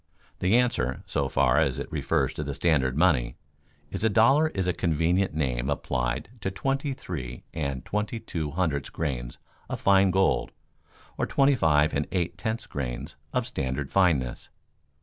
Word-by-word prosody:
The 95 +4 +3
answer, 115 - 0
so 70 -2 -1
far 65 -2 +3
as - - +1
it - - -5
refers - - 0
to 75 - -4
the 70 -1 -4
standard 70 -5 +2
money, 70 -9 +3 0.6
is: 95 - -3
a 110 - +4
dollar 135 +9 +5
is 95 -11 -2
a 90 - +2
convenient 85 +2 +1
name 65 -4 -1
applied 65 0 -1
to 95 - -1
twenty 135 +9 -1
three 65 - -6
and 70 -5 -3
twenty 105 +3 -2
two 85 -9 -4
hundredths 75 -3 -1
grains 65 -7 -4 0.3
of - - -3
fine 95 -1 +5
gold 95 +1 +1 0.7
or - - +1
twenty 140 +1 +4
five 75 - +3
and 75 +1 0
eight 85 -2 -1
tenths 110 +4 -3
grains 60 -3 -5 0.2
of - - 0
standard 65 +1 -3
fineness. 80 -11 +1
80 Hz, 160 wpm, -27 LUFS, 65-95 Hz, 0.7 s, dollar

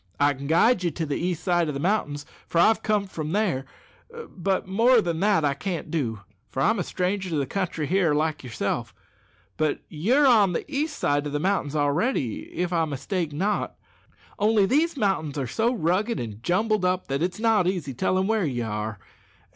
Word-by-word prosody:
I 145 0 +4
can 140 +1 -7
guide 180 - +4
you 175 - +2
to 165 +1 -3
the 145 -2 -2
east 175 -1 -2
side 175 -3 +2
o' - - 0
the 140 - -4
mountains, 150 -5 -1 0.2
for - - -3
I've 215 +6 +5
comed 205 -3 0
from 155 0 -4
there; 190 -11 0 0.7
but 190 0 -1
more 230 +6 +4
than 170 -5 -1
that 200 -5 +3
I 140 - +2
can't 160 +2 -4
do, 115 -10 -2 0.3
for - - -5
I'm 225 +5 +2
a - - 0
stranger 185 +2 -2
to 165 - -2
the 140 -2 0
country 175 -3 -2
here, 175 -2 +2
like 155 0 -1
yourself. 120 -4 -3 0.6
But 155 -2 0
you're 235 - +2
on 215 -8 +5
the - - -2
east 300 +1 -2
side 145 +1 0
o' - - -3
the 145 +1 -2
mountains 160 -4 0
already, 145 - 0
if 180 0 -2
I 165 -1 +2
mistake 160 +3 -3
not; 195 +8 -1 0.6
only 210 -1 +4
these 300 - +1
mountains 175 - 0
are 135 - -1
so 225 - 0
rugged 210 +2 0
and 110 -2 -6
jumbled 210 - +1
up, 185 0 +1
that 135 +2 -2
it's 180 +4 -1
not 220 -5 +3
easy 175 -8 -2
tellin' 185 +7 +1
where 220 0 +1
ye 130 -7 -1
are. 105 -1 -3
175 Hz, 195 wpm, -25 LUFS, 145-205 Hz, 0.7 s, I've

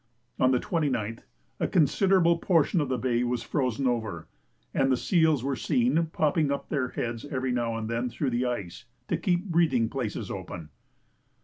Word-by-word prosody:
On 130 - +4
the 130 - +3
29th 125 - -2 0.3
a - - +1
considerable 170 +1 +3
portion 165 -1 +2
of 145 - -2
the 130 - 0
bay 120 0 0
was 120 -1 -1
frozen 130 -1 -1
over, 110 -9 -2 0.5
and 135 0 +2
the 130 - +3
seals 160 -7 +2
were 135 0 -1
seen 235 - +1
popping 155 -1 +1
up 140 - -3
their 135 -4 0
heads 115 -2 -4
every 130 -2 -2
now 120 -2 -1
and 110 -1 -4
then 115 +2 -1
through 130 +3 -2
the 120 +1 0
ice 100 -3 -5 0.2
to - - +1
keep 180 -1 0
breathing 160 - +2
places 125 -6 -4
open. 80 -2 -7
130 Hz, 175 wpm, -27 LUFS, 120-160 Hz, 0.5 s, On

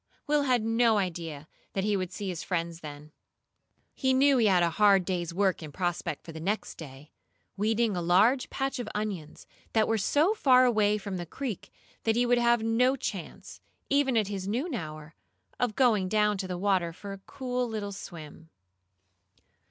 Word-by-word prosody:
Will 295 -1 +2
had 250 -5 +2
no 225 0 +3
idea 165 -6 -4 0.3
that 195 - -1
he 210 0 +1
would 185 -2 -2
see 200 +1 -5
his 170 -3 -4
friends 170 -2 -3
then. 150 -1 -10 0.8
He 260 -1 +1
knew 275 +1 +5
he 225 - +4
had 180 -3 +4
a 170 - +2
hard 200 -3 +6
day's 175 -3 -2
work 190 +1 +1
in 155 -2 -8
prospect 175 -2 -3
for 165 - -8
the 160 - -8
next 200 +7 -2
day 145 -1 -11 0.4
weeding 215 +1 +1
a 175 - -1
large 205 +10 +3
patch 270 -1 -2
of 235 -3 -4
onions 200 -8 -4 0.3
that 220 -1 +3
were 225 -1 +1
so 300 - +2
far 255 -10 +5
away 210 -3 +3
from 200 -2 -5
the 175 -1 -6
creek 245 - -5 0.3
that 225 -1 +1
he 245 +1 +2
would 245 0 +3
have 235 -1 +3
no 245 +4 +3
chance, - - -6 0.3
even 275 -3 +3
at 215 -3 +2
his 195 -2 -4
noon 265 - -2
hour, 155 -6 -6 0.5
of 240 -4 0
going 215 -8 +3
down 210 0 +2
to 185 - -3
the 180 -1 -4
water 185 -3 +1
for 195 +4 -8
a 195 - -9
cool 250 -2 -3
little 210 -2 -4
swim. 165 -4 -10
205 Hz, 185 wpm, -28 LUFS, 175-240 Hz, 0.8 s, hard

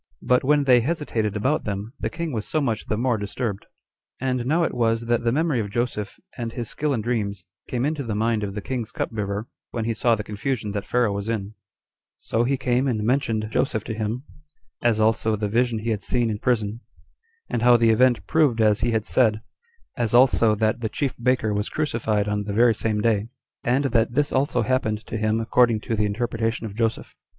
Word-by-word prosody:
But 125 0 +3
when 145 +2 +3
they 125 -3 +5
hesitated 115 -8 -1
about 130 +9 0
them, 105 +3 -4
the - - -2
king 170 -1 -4
was 110 -4 -3
so 155 - 0
much 115 -7 -2
the 110 - -1
more 120 -1 +1
disturbed. 100 0 -4 0.5
And 125 -1 -1
now 165 +5 +2
it - - -1
was 115 -1 +1
that 120 0 0
the 115 - +2
memory 150 -1 +1
of 105 -2 -2
Joseph, 110 -2 -3 0.2
and 115 -2 -4
his 120 -3 -4
skill 150 0 -1
in 120 -5 0
dreams, 105 -5 -2 0.2
came 125 +1 -1
into 150 0 -1
the 115 -6 -3
mind 110 0 +1
of 100 -1 -4
the 105 - -4
king's 125 -4 -3
cupbearer, 105 -1 -3 0.2
when 115 -2 -3
he 115 - 0
saw 115 +2 +2
the 105 - -5
confusion 105 +1 -3
that 100 0 -4
Pharaoh 120 -4 +2
was 100 +2 -4
in; 105 -2 -3 0.6
so 115 - -1
he 135 +2 +1
came 130 +1 +1
and 110 -5 0
mentioned 115 -3 0
Joseph 110 -2 0
to 115 - -4
him, 110 +3 -3 0.6
as 115 -2 +2
also 110 0 +2
the 105 0 -2
vision 120 +2 +1
he 110 +2 -2
had 105 -2 -1
seen 120 0 +1
in 105 - -4
prison, 110 -3 0 0.7
and 115 - -2
how 120 0 +6
the 115 -1 +4
event 120 +2 +3
proved 145 -7 +2
as 105 -1 +4
he 120 - +1
had 110 -2 0
said; 110 -4 +2 0.5
as 120 -2 0
also 120 -3 +5
that 110 +2 0
the 110 - -1
chief 140 +2 -2
baker 125 -3 +1
was 105 0 -1
crucified 110 -8 -1
on 105 0 -1
the 100 - -3
very 115 +2 +5
same 110 0 -1
day; 110 -1 +1 0.4
and 125 +4 +2
that 120 -3 +1
this 145 +1 +1
also 130 -3 +1
happened 110 -3 -1
to - - -6
him 110 0 +1
according 115 0 +3
to 115 - -2
the 105 0 +1
interpretation 115 +1 -2
of 105 - -6
Joseph. 115 0 -1
115 Hz, 215 wpm, -24 LUFS, 105-125 Hz, 0.7 s, how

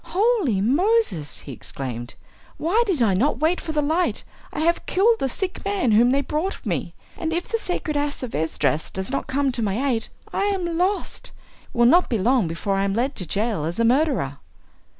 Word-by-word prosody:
"Holy 395 - +2
Moses!" 295 - +1
he 140 - -9
exclaimed, 120 -2 -6 0.4
"why 365 +9 +2
did 330 -11 +2
I 205 -4 +3
not 245 +11 +2
wait 320 +4 +1
for 320 - -4
the 300 -1 +1
light? 325 +5 0 0.3
I - - -3
have 340 +2 +1
killed 450 +5 +3
the 270 - 0
sick 370 +8 -3
man 395 - +1
whom 230 +3 +5
they 275 +2 +2
brought 310 +7 -3
me; - - -2 0.2
and 325 -1 -3
if 345 +2 -2
the 455 - -1
sacred 335 -6 -3
Ass 290 -1 -1
of 245 - -5
Esdras 160 0 0
does 190 +5 -4
not 275 - -2
come 275 0 +1
to 240 - -2
my 220 +7 0
aid 225 -2 -1 0.3
I 395 - +1
am 365 -5 -1
lost! 370 +4 -1 0.4
It - - -11
will 240 - +5
not 345 +9 +5
be 230 - +1
long 230 0 +2
before 165 +5 -2
I 195 - +1
am 195 0 0
led 260 +5 0
to 180 - -4
jail 210 -2 0
as 165 +7 -3
a - - +3
murderer." 245 - +1
275 Hz, 210 wpm, -23 LUFS, -, 0.4 s, whom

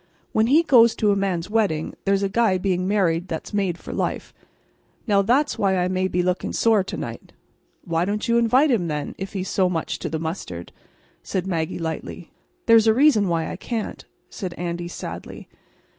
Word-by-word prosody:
When 220 +1 +2
he 305 +6 +5
goes 235 -7 +5
to 210 -1 +2
a - - +2
man's 190 -4 -1
wedding, 205 -8 0
there's 195 0 +2
a - - +2
guy 200 -1 +2
being 185 -1 -1
married 180 -4 +1
that's 165 +4 -6
made 195 -4 0
for - - -8
life. - - -3 0.7
Now, 205 -4 +3
that's 255 +9 +1
why 190 -2 +2
I'm 180 +1 0
maybe 185 -1 0
looking 180 +1 -1
sore 220 -4 +3
to 190 - -6
night." - - -7 0.5
"Why 165 -2 0
don't 210 +4 -2
you 235 0 +3
invite 255 +6 +4
him, 195 -8 +1
then, 150 -2 -3
if 195 +1 -6
he's 190 -2 -3
so 185 -2 +2
much 165 -3 -3
to - - -4
the 160 - -2
mustard?" 160 - -5 0.5
said 185 -1 -3
Maggie, 165 -4 -2
lightly. 165 +1 -6 0.3
"There's 230 -1 +6
a 220 - +5
reason 255 -7 +4
why 165 -2 0
I - - -6
can't," 225 -3 -4 0.2
said 185 -4 -6
Andy, 175 0 -4
sadly. 175 - -8
190 Hz, 190 wpm, -23 LUFS, 175-220 Hz, 0.7 s, There's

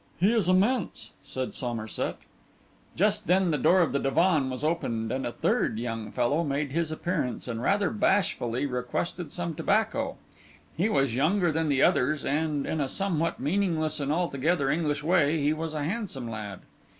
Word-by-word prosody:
'He 200 +6 +4
is 210 -6 +2
immense,' 200 +4 +1
said 130 -1 -5
Somerset. 115 -3 -3 0.8
Just 210 +2 +2
then 185 -1 +3
the 150 - +1
door 185 +1 +5
of 165 - +2
the 140 - 0
divan 155 0 +2
was 130 +2 -5
opened, 115 -9 -1
and 130 0 -2
a - - -3
third 115 - 0
young 115 -2 -4
fellow 135 +7 +1
made 140 -1 -2
his 165 +1 -1
appearance, 155 -7 -2
and 115 -1 -3
rather 200 +7 +2
bashfully 145 - +1
requested 140 +6 -3
some 170 -2 -3
tobacco. 220 - 0 0.6
He 220 - +1
was 135 - +1
younger 170 - +2
than 160 0 0
the 135 -2 +3
others; 145 +3 +2
and, 150 0 0
in 160 - -1
a 135 - -1
somewhat 170 -3 -1
meaningless 155 -1 0
and 140 0 -1
altogether 155 -2 +1
English 150 -2 -1
way, 160 -2 +3
he 145 +1 +2
was 155 0 -4
a 150 - -2
handsome 165 - -3
lad. 105 -4 -6
155 Hz, 170 wpm, -27 LUFS, 135-180 Hz, 0.8 s, door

